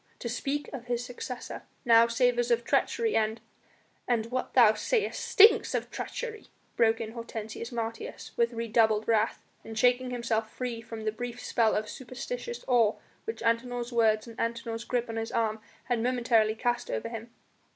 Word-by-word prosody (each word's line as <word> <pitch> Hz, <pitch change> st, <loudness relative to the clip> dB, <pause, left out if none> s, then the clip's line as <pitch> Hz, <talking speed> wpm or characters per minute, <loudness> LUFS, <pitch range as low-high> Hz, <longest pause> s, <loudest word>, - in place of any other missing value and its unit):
To -, -, -5 dB
speak 275 Hz, +5 st, -2 dB
of 250 Hz, -3 st, -6 dB
his 240 Hz, 0 st, -2 dB
successor 245 Hz, 0 st, -6 dB, 0.2 s
now 230 Hz, -1 st, +7 dB
savours 240 Hz, 0 st, +2 dB
of 235 Hz, 0 st, +2 dB
treachery 450 Hz, -, +1 dB
and 220 Hz, +1 st, +1 dB, 0.3 s
" -, -, -37 dB
"And 235 Hz, -3 st, +1 dB
what 255 Hz, 0 st, -3 dB
thou 230 Hz, -4 st, +8 dB
sayest 435 Hz, -, -1 dB
stinks 435 Hz, +1 st, +6 dB
of -, -, -2 dB
treachery," 455 Hz, -3 st, -5 dB, 0.3 s
broke 225 Hz, -1 st, +3 dB
in 220 Hz, -1 st, -4 dB
Hortensius 230 Hz, 0 st, -6 dB
Martius 230 Hz, -1 st, -5 dB
with 235 Hz, 0 st, +2 dB
redoubled 225 Hz, -2 st, +2 dB
wrath, 225 Hz, -1 st, +1 dB, 0.2 s
and 225 Hz, 0 st, -8 dB
shaking 250 Hz, +2 st, +3 dB
himself 230 Hz, -3 st, -1 dB
free 245 Hz, -2 st, -4 dB
from 225 Hz, -1 st, -8 dB
the 215 Hz, -, +1 dB
brief 245 Hz, +2 st, -6 dB
spell 230 Hz, -3 st, +2 dB
of 215 Hz, 0 st, -1 dB
superstitious 470 Hz, -, -6 dB
awe 235 Hz, -4 st, +4 dB, 0.3 s
which 450 Hz, -, -5 dB
Antinor's 240 Hz, +1 st, 0 dB
words 220 Hz, -2 st, +3 dB
and 230 Hz, -1 st, -11 dB
Antinor's 230 Hz, 0 st, -2 dB
grip 245 Hz, -1 st, -1 dB
on 225 Hz, 0 st, -5 dB
his 225 Hz, 0 st, -3 dB
arm 220 Hz, -1 st, 0 dB, 0.2 s
had 245 Hz, -3 st, 0 dB
momentarily 235 Hz, -3 st, +2 dB
cast 240 Hz, +2 st, -1 dB
over 110 Hz, -, -2 dB
him. 230 Hz, 0 st, -7 dB
235 Hz, 170 wpm, -29 LUFS, 225-245 Hz, 0.3 s, thou